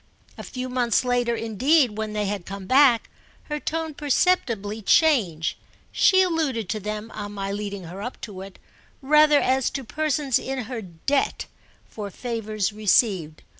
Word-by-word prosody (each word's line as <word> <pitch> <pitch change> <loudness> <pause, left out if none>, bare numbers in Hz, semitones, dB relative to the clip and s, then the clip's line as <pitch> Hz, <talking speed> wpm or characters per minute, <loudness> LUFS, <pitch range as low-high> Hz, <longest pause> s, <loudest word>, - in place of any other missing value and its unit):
A - - -8
few 255 -1 -6
months 250 -2 +1
later 245 -1 +1
indeed, 240 +3 +2
when 215 0 -4
they 210 -1 -1
had 200 -3 -4
come 195 0 -7
back, 255 0 +4 0.4
her 300 -1 -4
tone 320 +1 -3
perceptibly 245 - 0
changed: 205 - +2 0.3
she 375 -1 +5
alluded 305 - -1
to 215 - -2
them, 210 +2 -5
on 205 -1 -6
my 195 -1 -4
leading 200 -1 -5
her 175 +4 -8
up 245 +4 -6
to 195 -4 -7
it, 195 0 -10 0.5
rather 300 +1 +5
as 260 -1 +1
to 270 -2 -5
persons 285 +2 0
in 265 -1 -4
her 230 +1 -5
debt 190 - -2 0.4
for 210 -2 -7
favours 215 -2 -3
received. 195 -6 +1
230 Hz, 155 wpm, -24 LUFS, 205-275 Hz, 0.5 s, she